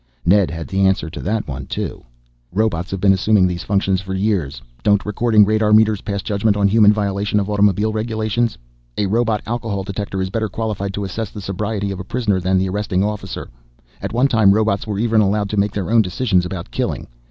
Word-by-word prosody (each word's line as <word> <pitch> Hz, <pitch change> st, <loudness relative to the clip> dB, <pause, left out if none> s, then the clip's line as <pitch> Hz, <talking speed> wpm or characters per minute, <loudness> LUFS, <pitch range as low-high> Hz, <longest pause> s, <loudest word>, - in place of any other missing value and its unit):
Ned 95 Hz, +1 st, +4 dB
had 80 Hz, 0 st, -6 dB
the 95 Hz, 0 st, +2 dB
answer 90 Hz, -4 st, 0 dB
to 90 Hz, -, -7 dB
that 110 Hz, +3 st, -2 dB
one 65 Hz, -2 st, -6 dB
too. -, -, -4 dB, 0.5 s
"Robots 95 Hz, -3 st, 0 dB
have 95 Hz, -, -4 dB
been 95 Hz, 0 st, +4 dB
assuming 95 Hz, 0 st, +3 dB
these 90 Hz, -1 st, -2 dB
functions 95 Hz, -2 st, 0 dB
for 95 Hz, 0 st, -5 dB
years. 95 Hz, -, -1 dB, 0.2 s
Don't 100 Hz, +5 st, +2 dB
recording 105 Hz, 0 st, +3 dB
radar 110 Hz, 0 st, +2 dB
meters 110 Hz, -1 st, +4 dB
pass 100 Hz, -2 st, -3 dB
judgment 105 Hz, 0 st, +1 dB
on 100 Hz, -1 st, +3 dB
human 105 Hz, 0 st, +5 dB
violation 100 Hz, 0 st, 0 dB
of 100 Hz, +1 st, -2 dB
automobile 105 Hz, +1 st, +2 dB
regulations? 110 Hz, +1 st, -1 dB, 0.4 s
A 105 Hz, -, +1 dB
robot 110 Hz, +1 st, 0 dB
alcohol 110 Hz, -4 st, -3 dB
detector 100 Hz, 0 st, -4 dB
is 95 Hz, 0 st, -2 dB
better 110 Hz, 0 st, -1 dB
qualified 105 Hz, -3 st, -3 dB
to 100 Hz, -, -3 dB
assess 100 Hz, +2 st, -4 dB
the 105 Hz, -, -9 dB
sobriety 100 Hz, +1 st, -3 dB
of 95 Hz, -, -5 dB
a -, -, -5 dB
prisoner 105 Hz, -2 st, -1 dB
than 95 Hz, +1 st, +1 dB
the 95 Hz, +1 st, +1 dB
arresting 95 Hz, -1 st, -1 dB
officer. 105 Hz, -9 st, -4 dB, 0.5 s
At -, -, -4 dB
one 125 Hz, +4 st, +3 dB
time 110 Hz, -6 st, +4 dB
robots 110 Hz, -1 st, 0 dB
were 105 Hz, -2 st, -2 dB
even 110 Hz, 0 st, +2 dB
allowed 105 Hz, 0 st, 0 dB
to 105 Hz, -, -2 dB
make 100 Hz, +1 st, +2 dB
their 100 Hz, 0 st, -3 dB
own 115 Hz, -1 st, +6 dB
decisions 95 Hz, -2 st, 0 dB
about 90 Hz, -2 st, -7 dB
killing. -, -, -2 dB
100 Hz, 210 wpm, -19 LUFS, 95-110 Hz, 0.5 s, own